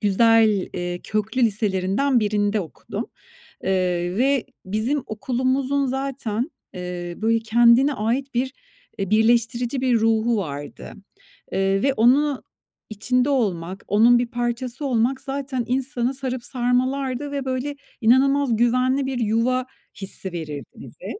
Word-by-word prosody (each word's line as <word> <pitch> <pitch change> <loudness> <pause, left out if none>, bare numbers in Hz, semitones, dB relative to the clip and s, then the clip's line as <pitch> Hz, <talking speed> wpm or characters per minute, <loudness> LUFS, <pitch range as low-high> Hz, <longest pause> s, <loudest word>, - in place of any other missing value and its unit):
güzel, 215 -1 +4
eee, 175 0 -4
köklü 220 +4 -1
liselerinden 210 +4 +1
birinde 205 0 +1
okudum, 165 -5 -6 0.6
ııı, 190 - 0 0.5
ve 270 0 +2 0.2
bizim 225 +8 -1
okulumuzun 260 +5 0
zaten, 265 -1 -3 0.2
ııı, 180 0 -6
böyle, 225 +1 +2
kendine 235 +5 +4
ait 250 +4 -2
bir, 255 +2 -1 0.4
eee, 195 -2 -3
birleştirici 235 +3 +2
bir 250 -3 +2
ruhu 225 +1 +2
vardı, 145 -7 -6 0.6
ııı, 195 - 0 0.2
ve 275 - +3
onun 270 +4 +3 0.5
içinde 250 +5 0
olmak, 190 -8 -1
onun 235 +4 +5
bir 245 - -1
parçası 240 +3 -3
olmak 255 +1 +1
zaten 270 -2 -3
insanı 255 0 -1
sarıp 260 -2 -4
sarmalardı 255 +2 -1
ve, 280 -2 -3
böyle, 260 +2 -2 0.3
inanılmaz 265 +2 +4
güvenli 255 +3 +2
bir 265 -2 -3
yuva 235 +3 +1 0.4
hissi 190 -1 -3
verirdi 155 -4 -5
bize. - - -13
240 Hz, 120 wpm, -23 LUFS, 215-265 Hz, 0.6 s, onun